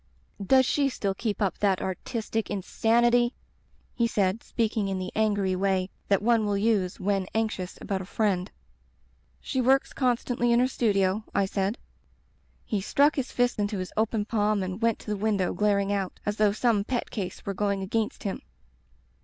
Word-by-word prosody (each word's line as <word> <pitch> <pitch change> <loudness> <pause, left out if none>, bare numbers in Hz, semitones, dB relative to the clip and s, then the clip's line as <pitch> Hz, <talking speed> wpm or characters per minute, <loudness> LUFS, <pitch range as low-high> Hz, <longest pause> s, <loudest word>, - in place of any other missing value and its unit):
"*Does 260 +5 +5
she 280 +2 +2
still 200 -6 -2
keep 210 +1 -2
up 190 -3 -1
that 195 -3 +2
artistic 220 +4 -3
in 195 -2 -3
sanity?' 240 +3 +2 0.6
he 235 - +1
said, 200 -1 0
speaking 220 -3 -1
in 195 -1 -2
the 185 0 -4
angry 205 -3 +1
way 190 0 0 0.2
that 200 0 +2
one 230 -1 +3
will 205 -1 0
use 200 -4 +1
when 195 -1 0
anxious 215 -5 -2
about 195 -2 -3
a - - -7
friend. 195 -2 0 0.9
"*She 260 - -1
works 265 +2 +3
constantly 245 -1 +1
in 235 - +4
her 250 - +4
studio/ 205 -5 +1
I 200 - +3
said. 195 +3 -1 0.9
He 210 -3 -1
struck 285 +9 +3
his 270 -2 -2
fist 245 -2 +1
into 205 0 -1
his 185 -1 -5
open 220 -1 0
palm 210 -2 +1
and 185 +3 -5
went 230 -1 +2
to - - -16
the - - 0
window, 200 -3 0
glaring 200 -1 +1
out, 195 -2 -3
as 205 0 -1
though 210 -1 +4
some 215 -1 +1
pet 245 +2 -3
case 195 -5 -5
were 200 - -2
going 200 0 -1
against 215 +3 -2
him. 195 - -3
210 Hz, 180 wpm, -27 LUFS, 195-230 Hz, 0.9 s, Does